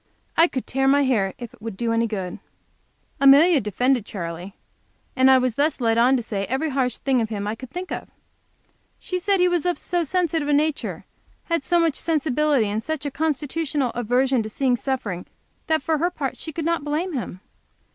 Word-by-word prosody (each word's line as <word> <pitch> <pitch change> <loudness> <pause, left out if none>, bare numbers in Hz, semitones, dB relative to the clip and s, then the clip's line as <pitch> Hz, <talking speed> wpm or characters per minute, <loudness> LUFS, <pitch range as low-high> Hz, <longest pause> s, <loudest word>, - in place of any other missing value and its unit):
I 330 - +6
could 260 -6 -4
tear 270 +1 0
my 285 +1 +4
hair 215 -8 +1
if 240 -3 -8
it - - -20
would 220 -3 -6
do 230 +1 -1
any 230 0 +1
good? 190 -5 -5 0.8
Amelia 285 +3 +6
defended 245 +4 +1
Charley, 180 0 -6 0.6
and 260 0 +5
I 265 - +7
was 255 -2 +1
thus 290 +4 0
led 230 -2 +2
on 255 +3 +5
to 240 - -3
say 200 -3 -3
every 270 +7 -1
harsh 255 -3 0
thing 265 -3 +1
of 220 - -2
him 205 -2 -3
I 210 - -1
could 250 +2 -9
think 360 +6 -6
of. - - -5 0.9
She 365 -1 -4
said 390 +1 +1
he 360 - +5
was 350 -3 +1
of 355 -1 0
so 350 -1 -1
sensitive 330 -2 0
a 295 - +2
nature, 300 +1 -1 0.4
had 335 -4 -1
so 345 +5 +2
much 330 -3 +2
sensibility, 300 -5 +1
and 210 +2 -2
such 310 +1 -4
a 285 - -2
constitutional 295 -2 -1
aversion 245 +2 +1
to 215 - -5
seeing 255 +3 +1
suffering, 230 -9 -3 0.4
that 315 -3 +1
for 315 +1 0
her 345 +3 +2
part 290 -7 -4
she 320 - -6
could 320 0 -4
not 335 -3 0
blame 315 +5 -2
him. 215 -8 -4
270 Hz, 205 wpm, -23 LUFS, 230-315 Hz, 0.9 s, I